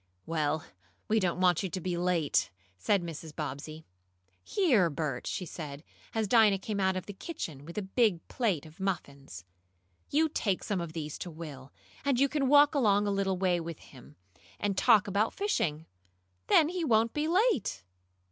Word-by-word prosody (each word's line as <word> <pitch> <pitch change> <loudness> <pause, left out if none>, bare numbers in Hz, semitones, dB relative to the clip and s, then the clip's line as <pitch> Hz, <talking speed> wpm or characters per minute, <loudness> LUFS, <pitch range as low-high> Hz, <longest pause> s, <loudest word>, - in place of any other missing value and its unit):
"Well, 155 -2 -1 0.4
we 220 +1 +3
don't 180 -3 0
want 180 -2 +3
you 190 - -3
to 180 - -4
be 180 0 -2
late," 175 -4 +1 0.3
said 180 - +2
Mrs. 160 -2 -7
Bobbsey. 155 +1 -6 0.6
"Here, 245 - +3
Bert," 145 -3 -3
she 185 - -3
said, 150 -3 -7 0.3
as 220 -1 +1
Dinah 215 -2 +5
came 200 +1 -4
out 190 -1 +2
of 185 - -4
the 205 - -7
kitchen 165 - -7
with 170 +4 -10
a 210 - -1
big 195 -3 +1
plate 200 - -1
of 160 +3 -15
muffins, 140 - -4 0.6
"you 315 +3 +3
take 205 - -1
some 195 -4 -1
of 165 -2 -6
these 155 -2 -5
to 180 - -5
Will, 150 -5 -9 0.3
and 275 -4 +1
you 275 - +5
can 275 -2 0
walk 290 +1 +6
along 210 -7 +3
a 205 - 0
little 195 -1 0
way 180 -2 +1
with 165 -1 -6
him, 135 +2 -16 0.4
and 205 -1 -1
talk 210 -1 +5
about 205 +3 +1
fishing. 165 - -1 0.6
Then 310 - +5
he 360 -1 -2
won't 225 -4 +2
be 300 +1 -1
late. 360 - +1
185 Hz, 175 wpm, -30 LUFS, 160-225 Hz, 0.6 s, walk